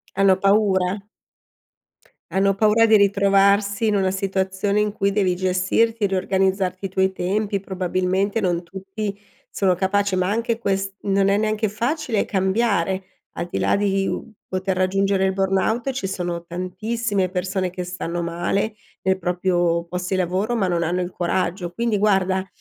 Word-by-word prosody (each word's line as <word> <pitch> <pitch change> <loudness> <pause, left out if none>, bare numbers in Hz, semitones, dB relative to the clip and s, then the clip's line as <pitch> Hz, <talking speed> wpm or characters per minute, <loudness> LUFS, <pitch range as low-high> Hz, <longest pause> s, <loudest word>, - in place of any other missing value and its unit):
Hanno 195 -1 +4
paura. 195 -1 +2 1.3
Hanno 195 +1 +2
paura 215 +3 +4
di 220 - +5
ritrovarsi 200 +1 +3
in 210 - +2
una 190 -2 +1
situazione 190 +1 -1
in 210 0 0
cui 200 -1 0
devi 190 -3 +1
gestirti, 185 +5 +1
riorganizzarti 190 0 0
i - - -2
tuoi 190 0 +1
tempi, 200 +2 -1
probabilmente 190 +2 -1
non 175 -4 0
tutti 195 +3 -6 0.3
sono 190 -2 +1
capaci. 200 +2 0
Ma 185 0 +1
anche 230 +2 -1
quest 195 -3 -1
non 195 0 +2
è 200 - +3
neanche 215 0 0
facile 235 +2 -1
cambiare, 190 -2 0 0.3
al 175 - -4
di - - -3
là - - +2
di, 195 -1 +1
uhm, 230 - -4 0.2
poter 185 0 -2
raggiungere 195 +1 +1
il 190 - +1
burnout, 195 +6 0
ci 265 -5 -4
sono 175 -2 -3
tantissime 190 +3 -2
persone 185 0 -2
che 180 0 -5
stanno 175 -1 -4
male 175 +5 -1 0.3
nei 190 0 +1
proprio 175 -1 0
post 180 +1 -4
di 190 - 0
lavoro 185 +6 0
ma 200 -5 +1
non 170 -1 0
hanno 175 +2 0
il 180 - -3
coraggio. 175 0 -2
Quindi 230 +2 0
guarda, 190 -2 +1
195 Hz, 155 wpm, -22 LUFS, 185-205 Hz, 1.3 s, di